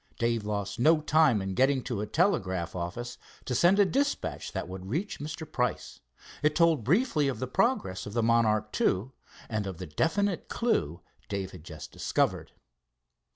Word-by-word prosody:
Dave 115 -2 0
lost 100 0 -3
no 155 +5 +5
time 155 -8 +3
in 95 0 -3
getting 130 +4 +2
to 115 -5 -3
a 105 - -3
telegraph 95 - 0
office, 90 +8 -5 0.3
to 125 - -2
send 175 +10 +4
a 205 - +6
dispatch 280 +8 -1
that - - -4
would 95 0 -8
reach 170 - -2
Mr. 155 +2 -5
Price. 125 -5 -2 0.4
It 150 +1 +2
told 165 -7 +3
briefly 160 - +2
of 135 - -1
the 130 - -2
progress 130 - 0
of 105 - -7
the 115 -1 +1
Monarch 110 -2 +2
II 100 +8 +1 0.4
and 110 -3 -2
of 95 -3 -5
the 90 - -6
definite 170 - 0
clew 85 - 0 0.3
Dave 95 -2 -3
had 90 -4 -11
just 80 -3 -9
discovered. - - 0
120 Hz, 170 wpm, -29 LUFS, 95-160 Hz, 0.4 s, a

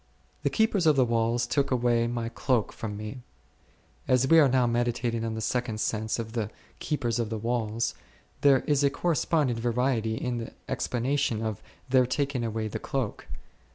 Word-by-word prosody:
The - - +1
keepers 220 -6 +2
of 155 - +6
the 130 -2 +4
walls 115 +1 +1
took 140 +3 0
away 120 -2 +2
my 120 -1 -2
cloak 120 -2 0
from 105 -2 -5
me. 110 +4 -7 0.9
As 130 0 +3
we 165 +3 +7
are 145 -3 +6
now 125 -1 +3
meditating 120 -1 0
on 110 -1 -3
a - - -3
second 120 -1 -1
sense 110 0 -1
of 115 -1 -5
the 110 -3 -2 0.3
keepers 120 -6 -1
of 115 -2 -1
the 110 - -3
walls, 115 0 -1 0.5
there 140 -2 +5
is 145 -1 +1
a 140 - +5
corresponding 150 -4 +1
variety 115 -1 0
in 120 +1 -2
the 115 - -7
explanation 125 -2 -1
of 110 -3 -3 0.3
their 130 -1 +4
taking 140 -1 -1
away 110 -1 -2
the 105 - -4
cloak. 130 -6 -3
120 Hz, 175 wpm, -27 LUFS, 115-130 Hz, 0.9 s, we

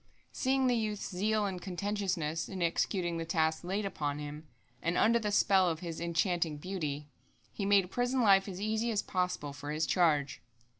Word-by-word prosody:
Seeing 265 0 +1
the 250 -1 +3
youth's 215 -3 -2
zeal 210 +3 +1
and 185 -3 -4
conscientiousness 180 -4 -2
in 185 -3 -3
executing 170 0 0
the - - -2
tasks 160 -1 0
laid 195 +4 -2
upon 145 -7 -2
him, 150 +1 -7 0.3
and 170 +1 0
under 235 +2 +4
the 210 -2 -2
spell 190 -2 +4
of 165 0 -3
his 165 -2 -5
enchanting 170 -2 0
beauty, 150 -4 -4 0.5
he 200 - -2
made 195 -2 +4
prison 245 +3 +1
life 195 -2 +5
as 185 -2 -6
easy 220 +3 0
as 215 -3 0
possible 180 -6 -2
for 145 +1 -8
his 155 +1 0
charge. 150 -7 +2
180 Hz, 180 wpm, -32 LUFS, 160-205 Hz, 0.5 s, life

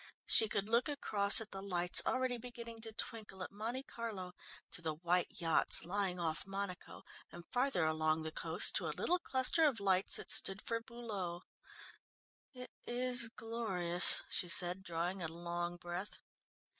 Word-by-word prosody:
She 220 - +5
could 200 -1 -2
look 235 +6 +1
across 210 -8 +5
at 220 - -7
the 195 - -6
lights 180 -3 +3
already 255 -2 -1
beginning 235 -1 -8
to 225 0 -4
twinkle 215 -3 -7
at - - -8
Monte 230 +6 -4
Carlo, 210 -8 -7 0.4
to - - -4
the 160 -2 -3
white 175 +2 +1
yachts 165 -2 +2
lying 185 0 -2
off 160 -1 -3
Monaco, 195 -2 -6 0.3
and 175 0 -11
farther 245 -9 +1
along 155 0 0
the 160 - -4
coast 165 +2 +3
to - - -3
a - - -5
little 360 +1 0
cluster 265 +2 +2
of 280 -8 +2
lights 195 -1 +1
that - - 0
stood 195 0 +2
for 230 0 -2
Beaulieu. 210 -7 -6 1.1
"It 250 -2 -11 0.2
is 245 -1 +5
glorious," 195 -7 0
she 175 - -3
said, 180 0 +4
drawing 175 +1 -4
a 165 - -2
long 175 +1 -5
breath. 175 +3 -7
195 Hz, 160 wpm, -35 LUFS, 175-230 Hz, 1.1 s, She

